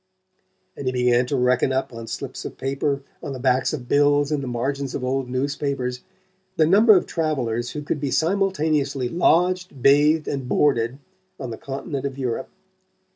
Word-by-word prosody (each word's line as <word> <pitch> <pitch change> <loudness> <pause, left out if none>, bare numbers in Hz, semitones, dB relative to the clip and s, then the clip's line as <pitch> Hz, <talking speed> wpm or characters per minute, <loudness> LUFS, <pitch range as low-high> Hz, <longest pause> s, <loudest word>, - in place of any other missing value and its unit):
And 140 - -6
he - - +2
began 125 -1 +2
to 140 - -1
reckon 125 0 +2
up, 130 -1 -1
on 115 0 -8
slips - - -6
of - - -7
paper, 140 +1 -2 0.2
on 140 - -5
the 130 - -7
backs 130 0 +2
of 125 -5 -5
bills 145 +1 +3
and 150 -2 0
the 135 - -5
margins 135 +3 -2
of 125 - -4
old 130 0 -1
newspapers, 130 -1 -2 0.6
the 155 - +5
number 205 +5 +6
of - - 0
travellers 125 -8 -1
who 150 - -5
could 145 - -2
be 140 -1 -2
simultaneously 155 -6 0
lodged, 180 0 +1
bathed 150 +3 +4
and 135 -3 -3
boarded 125 -3 +2 0.4
on 130 -3 -5
the - - -4
continent 140 0 -4
of 135 -1 -8
Europe. 125 -4 -3
140 Hz, 175 wpm, -23 LUFS, 125-150 Hz, 0.6 s, number